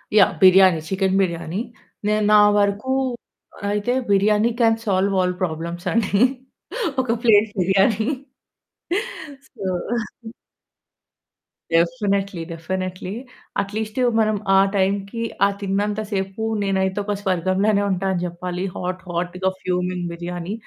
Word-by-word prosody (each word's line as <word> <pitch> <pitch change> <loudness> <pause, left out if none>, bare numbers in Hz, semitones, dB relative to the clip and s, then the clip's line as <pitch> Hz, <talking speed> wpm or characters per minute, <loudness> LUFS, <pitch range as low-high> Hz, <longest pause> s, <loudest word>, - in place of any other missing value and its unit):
Yeah! 215 - +6
Biryani. 185 -2 +7
Chicken 190 0 +1
biryani. 170 +1 -2 0.5
నేను 210 0 +2
నా 210 - +8 0.2
వరకు 205 +5 +1 0.8
అయితే 210 +3 0 0.2
biryani 210 +3 +3
can 225 -1 +4
solve 195 -1 +1
all 180 0 +1
problems 170 +1 -3
అండి. 205 -3 +1 0.8
ఒక 255 - -7
plate 220 -2 +5
biryani. 195 +4 +2 1.5
So 210 -5 -8 2.1
definitely, 195 0 +1
definitely 185 +3 -4 0.5
at least 215 +3 -5 0.2
మనం 215 -1 +2 0.2
ఆ - - +7 0.2
టైంకి, 200 +3 0 0.2
ఆ - - +5
తిన్నంత 205 +2 -1
సేపు 195 +2 -3 0.2
నేనైతే 190 0 0
ఒక 205 - -1
స్వర్గంలోనే 195 +2 +1
ఉంటా 190 +1 -1
అని 175 - -2
చెప్పాలి. 180 +1 -4
హాట్ 185 +1 -4
హాట్‌గా 180 +2 -1
ఫ్యూమింగ్ 180 0 -2
బిర్యానీ. 175 +2 -5
195 Hz, 105 wpm, -22 LUFS, 180-205 Hz, 2.1 s, నా